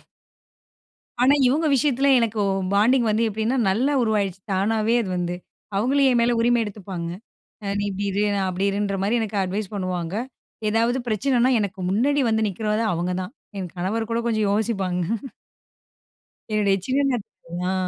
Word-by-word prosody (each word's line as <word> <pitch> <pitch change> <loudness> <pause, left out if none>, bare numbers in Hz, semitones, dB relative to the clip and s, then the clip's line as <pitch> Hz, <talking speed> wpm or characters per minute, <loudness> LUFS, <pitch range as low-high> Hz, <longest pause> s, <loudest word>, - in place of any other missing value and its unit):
அதுலல்லாம். - - -26 1.2
ஆனா, 265 +3 +6
இவங்க 300 +6 +2
விஷயத்துல 275 0 +2
எனக்கு 225 -2 0 0.3
பாண்டிங் 235 +4 +4
வந்து, 220 +2 +2
எப்படின்னா 220 +5 -1
நல்லா 255 +9 +1
உருவாகிடுச்சு. 200 -4 0
தானாவே 215 +4 +1
அது 195 - -4
வந்து. 175 0 -2 0.4
அவங்களும் 270 +6 +3
என் 240 - +3
மேல 240 +1 +3
உரிமை 240 0 +3
எடுத்துப்பாங்க. 190 -5 -6 0.7
நீ - - -1
இப்படி 200 +1 -3
இரு, 205 +2 0
நான் 195 -1 0
அப்படி 185 +2 -1
இருன்ற 200 0 -1
மாரி 215 +4 +1
எனக்கு 210 -2 -3
அட்வைஸ் 195 +2 -3
பண்ணுவாங்க. 185 -3 -3 0.6
ஏதாவது 230 +3 +2
பிரச்சனைன்னா 245 +3 +2
எனக்கு 200 -1 -3
முன்னாடி 275 +9 +2
வந்து 220 0 +2
நிக்குறதே 215 +3 -1
அவுங்க 175 +2 -1
தான். 185 +6 -7 0.2
என் 180 -3 -5
கணவர் 215 +6 -2
கூட 230 - +1
கொஞ்சம் 215 -3 +1
யோசிப்பாங்க. 195 -4 0 1.5
என்னுடைய 205 -2 +2
சின்ன 270 +2 +1
நத் 235 -5 -3 0.4
அ. - - 0
215 Hz, 150 wpm, -23 LUFS, 195-235 Hz, 1.5 s, ஆனா